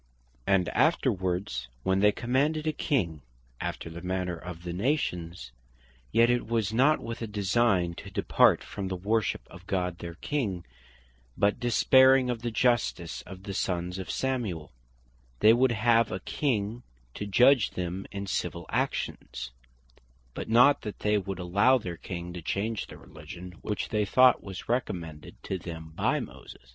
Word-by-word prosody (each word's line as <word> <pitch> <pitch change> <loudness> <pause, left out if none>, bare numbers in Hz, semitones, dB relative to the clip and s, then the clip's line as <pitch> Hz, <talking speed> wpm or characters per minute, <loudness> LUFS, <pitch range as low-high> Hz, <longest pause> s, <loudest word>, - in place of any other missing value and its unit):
And 95 -3 +3
afterwards 95 - 0 0.2
when 95 0 +2
they 105 +1 +5
demanded 140 +8 0
a 155 - 0
King, 90 - -1 0.4
after - - -4
the 85 +1 -8
manner 90 -1 -2
of 85 0 -9
the 85 -1 -4
nations; 90 - -2 0.6
yet 115 +1 +5
it 120 -1 +1
was 110 -2 0
not 140 +6 +4
with 115 0 -6
a 115 - -3
design 100 -3 +1
to - - -8
depart - - +3
from 100 -2 -5
the 95 - -3
worship 105 +4 0
of 90 +1 -14
God 90 -2 -1
their 85 -1 -7
King; 100 - -2 0.7
but 100 +3 +2
despairing 130 +2 +5
of 115 -2 -4
the 120 - -2
justice 115 -8 0
of 95 -1 -10
the 100 -1 -5
sons 90 -1 -2
of 95 - -6
Samuel, 110 - -2 0.7
they 110 - +7
would 125 +1 +3
have 115 0 +3
a 95 - -3
King 115 -4 -1 0.3
to 105 - -5
judg 125 +4 +4
them 90 +2 -4
in 100 0 -4
Civill - - -3
actions; - - -3 0.8
but - - -6
not 125 +5 +6
that 105 - -7
they 105 0 +2
would 95 -1 -5
allow 100 +9 +3
their 90 -8 -6
King 85 -1 -6
to 90 - -6
change 100 +6 -2
the - - -11
Religion 80 +4 -10
which 105 - -3
they 105 -2 +1
thought 125 +4 +5
was 95 -2 -8
recommended 85 -11 -3
to 95 - -3
them 80 -2 -8
by - - +1
Moses. - - -11
100 Hz, 160 wpm, -28 LUFS, 90-120 Hz, 0.8 s, they